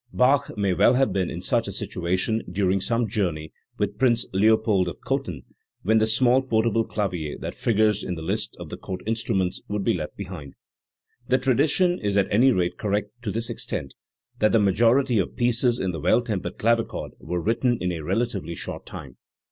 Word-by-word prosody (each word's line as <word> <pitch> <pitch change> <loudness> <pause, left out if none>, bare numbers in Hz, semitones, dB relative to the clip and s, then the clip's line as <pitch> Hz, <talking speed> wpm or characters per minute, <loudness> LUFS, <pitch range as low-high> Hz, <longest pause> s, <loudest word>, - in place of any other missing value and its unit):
Bach 135 0 +2
may 100 -2 +1
well 120 +7 +4
have 130 -6 +2
been 95 -2 0
in 85 +2 -6
such 115 +3 +1
a - - -3
situation 95 +4 -1
during 95 0 +1
some 115 +3 0
journey 85 -7 -2 0.2
with - - -2
Prince 120 -3 +3
Leopold 105 -1 +3
of 85 - -6
Cothen, 90 - -3 0.4
when 110 +3 +3
the 110 - +2
small 125 +3 +4
portable 115 -2 +1
clavier 90 -9 -3
that - - -5
figures 105 -2 +1
in 90 - -3
the 80 - -7
list 100 +6 -2
of - - -8
the - - -6
Court 95 -1 -6
instruments 110 -5 -1
would 105 -1 -2
be - - +2
left 80 -4 -5
behind. 90 -8 -8 0.7
The 130 - +3
tradition 145 +8 +2
is 100 -1 -1
at 95 -1 +1
any 125 +6 +5
rate 90 -5 -1
correct 105 0 -1
to 115 - -4
this 115 +3 -2
extent, 70 - -4 0.5
that 110 - +3
the 115 - +5
majority 115 +5 +3
of 95 - -2
pieces 120 0 +2
in 95 -4 -1
the 80 - -5
Well 90 +10 +3
tempered 105 -6 -4
Clavichord 115 +1 0
were 90 - -3
written 115 +6 +1
in 90 0 -1
a 85 -2 -4
relatively 95 -2 -2
short - - -6
time. - - -9
105 Hz, 190 wpm, -24 LUFS, 90-120 Hz, 0.7 s, any